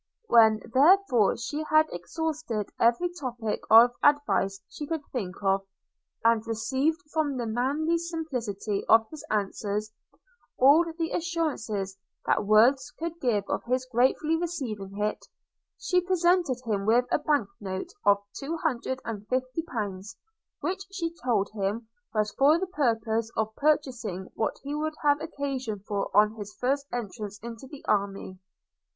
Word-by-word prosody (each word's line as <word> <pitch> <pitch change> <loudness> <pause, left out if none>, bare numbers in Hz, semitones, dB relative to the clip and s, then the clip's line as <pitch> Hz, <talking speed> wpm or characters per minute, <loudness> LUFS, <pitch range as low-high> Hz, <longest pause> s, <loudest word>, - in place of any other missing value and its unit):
When 220 - +5
therefore 280 - +5
she 290 +6 -3
had 310 0 +5
exhausted 280 - -3
every 240 +10 +3
topic 245 -9 -4
of 230 +2 +8
advice 290 -9 +2
she 295 - -7
could 320 -2 -3
think 195 -8 -4
of, 195 0 +2 0.6
and 230 -1 +5
received, 260 +8 0 0.2
from 300 -4 0
the 240 - -2
manly 280 +9 0
simplicity 250 - -3
of 225 0 +6
his 310 -2 -9
answers, 210 +1 -2 0.6
all 285 +6 +6
the 330 -1 -2
assurances 260 - -2 0.3
that - - +1
words 240 +6 +4
could 335 +1 -5
give 220 -6 +1
of - - -2
his 255 +1 0
gratefully 260 +6 +2
receiving 240 - -4
it, 210 +1 -2 0.5
she 360 -1 +1
presented 355 -6 +2
him 205 -3 -1
with 240 +3 +4
a - - +3
bank 295 -8 +1
note 195 - -5
of 200 0 +4
two 315 +4 -4
hundred 260 -5 -2
and 210 -2 -5
fifty 255 +4 -1
pounds; 200 - -5 0.4
which 375 +1 -2
she 335 -4 -3
told 220 -6 +2
him 215 +2 -2 0.2
was 215 -1 0
for 290 +4 +5
the 380 - -1
purpose 230 - 0
of 220 0 0
purchasing 250 -11 -1
what 220 - -1
he 285 +1 -4
would 310 +1 -2
have 290 0 +3
occasion 270 -7 -3
for 200 -1 -2
on 210 +1 +5
his 205 0 -8
first 275 +3 0
entrance 210 -3 -5
into 235 +2 -8
the 280 +1 -12
army. 195 -2 -1
245 Hz, 145 wpm, -27 LUFS, 215-305 Hz, 0.6 s, of